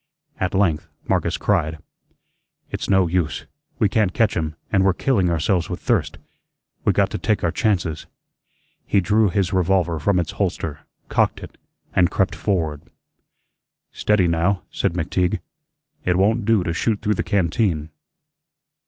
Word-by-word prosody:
At 95 +1 -1
length 90 -6 +1 0.2
Marcus - - 0
cried: 80 +1 0 0.9
"It's - - -4
no 95 -2 +4
use, 85 -2 -1 0.3
we 105 - +3
can't 100 -2 +1
catch 115 -3 +2
him, 80 -2 -2 0.2
and 95 -2 +3
we're 95 -1 +4
killing 100 -8 +1
ourselves 85 +2 0
with - - -4
thirst. - - 0 0.7
We - - +4
got - - +1
to - - -3
take 110 - 0
our 85 - +2
chances." 90 -8 -1 0.8
He 100 - +3
drew 105 +3 +3
his 95 -1 0
revolver 90 -3 +1
from 95 +5 +2
its 85 - -2
holster, 75 -3 -2 0.3
cocked - - +1
it, - - -10 0.4
and 90 -1 +4
crept 95 +1 0
forward. 80 -8 -1 1.1
"Steady, 105 -4 +2
now," 85 +3 +1
said - - 0
McTeague; 90 +1 0 0.6
"it 90 - +1
won' 105 +3 +2
do 110 -4 +3
to 85 -2 -2
shoot 105 +4 0
through 105 0 +2
the - - -1
canteen." 85 -5 0
90 Hz, 150 wpm, -22 LUFS, 85-100 Hz, 1.1 s, no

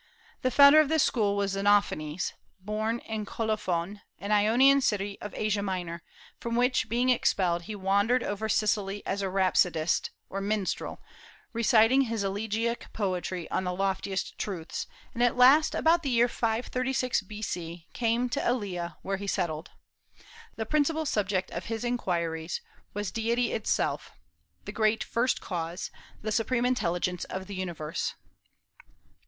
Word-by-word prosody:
The 255 - +2
founder 280 +4 +8
of 305 -2 +4
this 315 -2 +3
school 205 -4 +1
was 200 -1 0
Xenophanes, 195 -5 +1 0.3
born 215 +4 -2
in 220 -1 -3
Colophon, 205 -3 -2 0.2
an 200 - -5
Ionian 240 +7 +5
city 205 -4 0
of 210 - -6
Asia 210 -1 0
Minor, 180 -4 -3 0.4
from 235 0 -3
which 245 -2 +2
being 245 +3 +2
expelled 185 -9 +1
he 215 - -5
wandered 200 +6 +2
over 210 +2 -3
Sicily 205 -1 0
as 200 +1 -2
a 195 - -1
rhapsodist, 180 -3 +2 0.2
or 195 - -4
minstrel, 205 -1 -2 0.5
reciting 230 +2 +5
his 225 -3 -2
elegiac 220 +4 -2
poetry 185 -3 -2
on - - 0
the 180 -1 -2
loftiest 195 0 -2
truths, 175 -6 -4 0.3
and 235 - -3
at 245 0 +3
last, 270 +5 +6
about 335 +1 +4
the 280 - -2
year 240 -1 +4
536 250 +2 0
B.C., 180 -5 -6
came 235 +1 +1
to 280 - -1
Elea, 180 -9 -2
where 195 0 -1
he 200 +1 -6
settled. 170 -5 -2 0.9
The 220 - -3
principal 305 +4 +1
subject 195 -7 0
of - - -5
his 225 0 -3
inquiries 170 -8 -1 0.4
was 205 -2 -2
deity 235 +1 0
itself, 220 - -1 0.5
the - - -5
great 220 -1 +1
First 245 +2 0
Cause, 170 0 -4 0.3
the 215 - -2
supreme 235 +3 +1
Intelligence 180 -7 0
of 190 0 -5
the 200 - -8
universe. 175 -5 -3
210 Hz, 145 wpm, -28 LUFS, 190-235 Hz, 0.9 s, founder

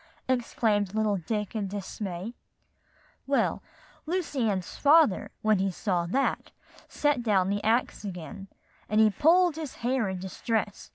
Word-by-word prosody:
exclaimed 220 -5 0
little 215 -2 +1
Dick 210 +4 -3
in 205 -3 -1
dismay. 195 +1 -5 0.9
"Well, 275 0 +1 0.5
Lucy 305 -9 -1
Ann's 185 -4 -3
father, 295 - +4
when 215 -2 +3
he 195 +1 +1
saw 180 -2 -1
that, 270 +10 -1 0.4
set 290 -4 0
down 195 -5 +2
the 205 0 -2
axe 225 0 +1
again, 195 +1 -7 0.4
and 215 +1 +2
he 220 -1 +6
pulled 335 - +4
his 310 -4 -6
hair 245 -5 +1
in 190 - -3
distress. 205 +3 -3
215 Hz, 135 wpm, -28 LUFS, 195-255 Hz, 0.9 s, he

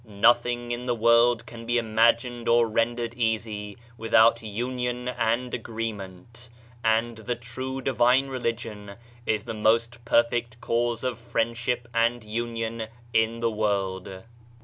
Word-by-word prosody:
Nothing 120 +3 +2
in 120 +1 -4
the 120 - +1
world 115 +1 +4
can 115 -1 -10
be 120 0 +2
imagined 115 +1 +2
or 115 0 +5
rendered 115 +1 0
easy 110 -3 -2 0.2
vrithout 115 +1 +4
union 125 +3 -3
and 120 0 -1
agreement; 115 0 -6 0.3
and 115 +1 +1
the 120 +2 -3
true 130 +3 -5
divine 130 +1 +3
religion 115 -5 -4 0.3
is 105 -2 +1
the - - -5
most 115 +2 +1
perfect 120 -1 +1
cause 120 0 -1
of 125 -2 -2
friendship 120 +1 -1
and 115 0 +1
union 115 0 -3 0.3
in 115 +1 +1
the 115 -1 +1
world. 95 -3 -2
115 Hz, 125 wpm, -26 LUFS, 110-120 Hz, 0.3 s, or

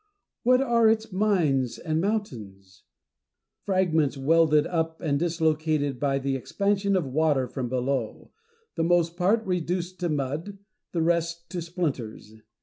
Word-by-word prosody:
What 255 +1 +4
are 235 -4 +4
its 220 0 0
mines 170 - +1
and 160 -1 -1
mountains? 105 - -4 0.8
Fragments 160 -7 +1
welded 155 +1 +3
up 160 -2 -2
and 145 -4 0
dislocated 155 -4 0
by 140 0 +1
the 135 0 -1
expansion 200 +8 0
of 180 -5 +1
water 140 -1 +1
from 125 0 -4
below; 125 -2 -2 0.4
the 165 - -1
most 170 0 +2
part 205 +6 +1
reduced 180 0 -2
to 175 -2 -1
mud, 150 +7 -3 0.3
the 165 -2 0
rest 170 0 -1
to 180 -2 -3
splinters. 145 - -4
165 Hz, 135 wpm, -26 LUFS, 140-185 Hz, 0.8 s, What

